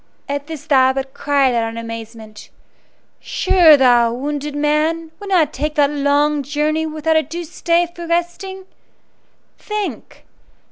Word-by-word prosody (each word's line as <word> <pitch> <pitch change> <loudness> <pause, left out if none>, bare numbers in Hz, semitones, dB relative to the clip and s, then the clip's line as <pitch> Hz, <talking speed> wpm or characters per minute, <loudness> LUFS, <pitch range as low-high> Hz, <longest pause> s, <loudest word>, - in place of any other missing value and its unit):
At 285 0 -4
this 315 -3 -8
the 310 - 0
Abbot 265 0 +2
cried 280 -3 +1
out 230 -1 0
in 225 - -9
amazement: 225 -2 -9 0.7
"Sure 340 -6 +4
thou, 240 -3 +4
wounded 290 +3 -4
man, 310 +2 0
would 405 - -8
not 325 -6 +2
take 300 +3 -3
that 290 -2 +3
long 290 +1 +1
journey 300 +3 -1
without 315 +1 0
a - - +4
due 335 +3 -6
stay 340 +1 0
for 345 0 -10
resting! 345 +3 -3 0.9
Think! 420 -1 -6
295 Hz, 140 wpm, -18 LUFS, 270-330 Hz, 0.9 s, Sure